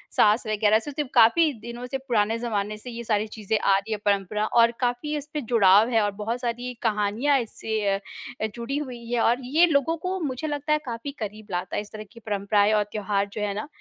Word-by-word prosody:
सास 215 +3 +4
वगैरह 215 0 +3
से 290 +6 -7
तो 295 +1 -2
काफ़ी 265 +7 +5
दिनों 235 +2 -7
से 270 - 0
पुराने 225 -2 +1
ज़माने 215 -3 -2
से 230 +4 -9
ये 235 0 -6
सारी 215 -1 0
चीज़ें 215 0 -2
आ 195 - +3
रही 200 +3 -5
है 215 - 0
परंपरा 205 +1 +1
और 230 +1 +4
काफ़ी 250 +5 -1
उसपे 295 +1 -5
जुड़ाव 220 -2 +5
है, 225 -2 +3
और 205 -1 +1
बहुत 215 +4 -4
सारी 245 +1 -3
कहानियाँ 220 +6 +2
इससे 220 -1 -3 0.2
अ, - - -4 0.6
जुड़ी 240 +4 -3
हुई 250 -5 -6
है 240 - +1
और 245 +3 +2
ये 310 +7 +4
लोगों 320 -1 +2
को 380 +1 -2
मुझे 295 -2 -3
लगता 295 0 -1
है 305 - +2
काफ़ी 240 +3 -5
करीब 215 -1 -6
लाता 180 0 -3
है - - 0
इस 210 - -13
तरह 215 -1 -7
की 235 - -14
परंपराएँ 205 -1 +1
और 210 -1 +3
त्योहार 200 -1 -1
जो 215 - -4
है 205 -1 -1
ना, 210 +7 -5
225 Hz, 220 wpm, -25 LUFS, 210-250 Hz, 0.6 s, काफ़ी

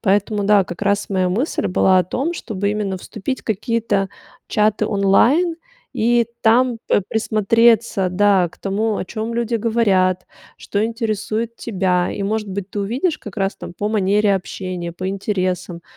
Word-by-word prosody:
Поэтому, 205 +1 +1
да, 205 -1 +4
как 175 +2 -8
раз 200 0 +1
моя 185 -1 +1
мысль 230 - -1
была 185 +1 +3
о 180 - +2
том, 275 - -2
чтобы 205 - -3
именно 205 -2 -2
вступить 215 +7 -5
в - - -31
какие-то 220 -2 0 0.4
чаты 215 0 +2
онлайн 240 - +3 0.4
и 235 +1 +2
там 235 +1 +3
п - - +3
присмотреться, 220 -2 +2
да, 190 -1 +3
к - - -20
тому, 210 +2 -1
о - - -3
чём 220 +4 -4
люди 235 0 0
говорят, 200 -5 +1 0.3
что 205 - -2
интересует 225 0 -2
тебя. 185 -4 0
И, 200 - -4
может 210 +1 -2
быть, 195 0 -5
ты 205 - -3
увидишь 255 - -1
как 210 0 -10
раз 195 0 -1
там - - -9
по 205 - -2
манере 205 0 +2
общения, 185 -2 -5
по 185 +2 -5
интересам, 185 -3 -2
205 Hz, 160 wpm, -20 LUFS, 190-225 Hz, 0.4 s, да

